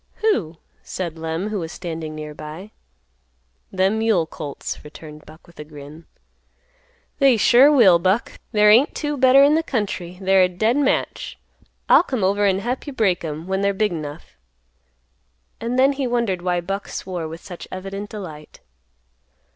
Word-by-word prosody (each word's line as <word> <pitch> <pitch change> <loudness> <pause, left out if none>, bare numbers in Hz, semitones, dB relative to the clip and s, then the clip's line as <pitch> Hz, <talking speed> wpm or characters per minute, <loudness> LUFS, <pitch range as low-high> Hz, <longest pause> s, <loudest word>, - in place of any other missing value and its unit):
"Who?" 200 - 0 0.2
said 170 -3 -6
Lem, 165 +5 -3
who 210 -2 -3
was 165 -2 -5
standing 160 -4 -6
near 150 0 -7
by. 155 +8 -9 1.0
"Them 195 +3 +1
mule 220 -7 +2
colts," 150 -3 -7
returned 150 0 -12
Buck 155 +2 -15
with 170 - -20
a - - -5
grin. 150 +1 -12 1.1
"They 270 -4 +5
sure 255 +7 +6
will, 205 -12 +6
Buck. 190 +6 0
There 210 -2 +5
ain't 245 +7 +4
two 295 -1 -2
better 265 0 +6
in 285 +1 +5
the 320 - +3
country; 200 - -4
they're 190 0 +3
a 185 - +5
dead 215 +7 0
match. 285 -2 -1 0.5
I'll - - +7
come 255 - -3
over 200 +2 +2
an' 190 0 +1
hep 250 +6 -4
you 285 - -5
break 195 -9 +1
'em 155 0 -5
when 190 +1 -2
they're 200 0 +1
big 210 0 +1
'nough." 150 -2 -8 1.2
And 235 +2 -3
then 270 +2 +4
he 270 -2 -2
wondered 235 -7 -1
why 175 -1 0
Buck 195 +3 -4
swore 180 -4 -5
with 165 +1 -9
such 175 -3 -10
evident 195 +2 -6
delight. 160 -8 -9
190 Hz, 165 wpm, -21 LUFS, 165-225 Hz, 1.2 s, I'll